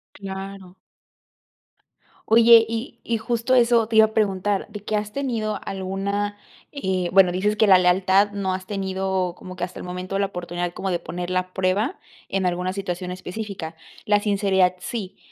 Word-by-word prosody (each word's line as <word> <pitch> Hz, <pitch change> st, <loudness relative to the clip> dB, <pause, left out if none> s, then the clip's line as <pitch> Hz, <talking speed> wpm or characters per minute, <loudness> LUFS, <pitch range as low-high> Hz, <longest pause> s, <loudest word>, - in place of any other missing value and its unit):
Claro. 195 Hz, -1 st, -8 dB, 1.5 s
Oye, 230 Hz, 0 st, +7 dB
y 230 Hz, +2 st, -5 dB
y 230 Hz, -1 st, -1 dB
justo 235 Hz, +2 st, 0 dB
eso 235 Hz, -2 st, +4 dB
te 225 Hz, -, -3 dB
iba 220 Hz, -, +9 dB
a 220 Hz, -, -6 dB
preguntar, 200 Hz, -2 st, 0 dB
de 210 Hz, -2 st, -8 dB
que, 215 Hz, -, -2 dB
¿has 210 Hz, 0 st, -2 dB
tenido 225 Hz, -6 st, -2 dB
alguna 200 Hz, +2 st, -3 dB, 0.3 s
eh, 185 Hz, -, -1 dB
bueno, 185 Hz, -1 st, +6 dB
dices 205 Hz, +4 st, 0 dB
que 220 Hz, -, +4 dB
la 190 Hz, -2 st, +7 dB
lealtad 190 Hz, +3 st, +3 dB
no 195 Hz, -2 st, -2 dB
has 185 Hz, 0 st, -5 dB
tenido 190 Hz, -2 st, -1 dB
como 185 Hz, 0 st, -9 dB
que 180 Hz, -, -5 dB
hasta 180 Hz, 0 st, -5 dB
el -, -, -7 dB
momento 180 Hz, +2 st, -4 dB
la 200 Hz, -, +1 dB
oportunidad 175 Hz, -1 st, -4 dB
como 195 Hz, -, -3 dB
de 175 Hz, -, 0 dB
poner 175 Hz, +1 st, -5 dB
la 185 Hz, 0 st, -1 dB
prueba 195 Hz, -, 0 dB, 0.3 s
en 190 Hz, -1 st, -1 dB
alguna 180 Hz, +1 st, -1 dB
situación 180 Hz, -2 st, -4 dB
específica? 185 Hz, -2 st, -6 dB, 0.3 s
La 205 Hz, 0 st, +3 dB
sinceridad, 195 Hz, -3 st, +2 dB
sí. 195 Hz, -1 st, -5 dB
195 Hz, 170 wpm, -23 LUFS, 185-210 Hz, 1.5 s, iba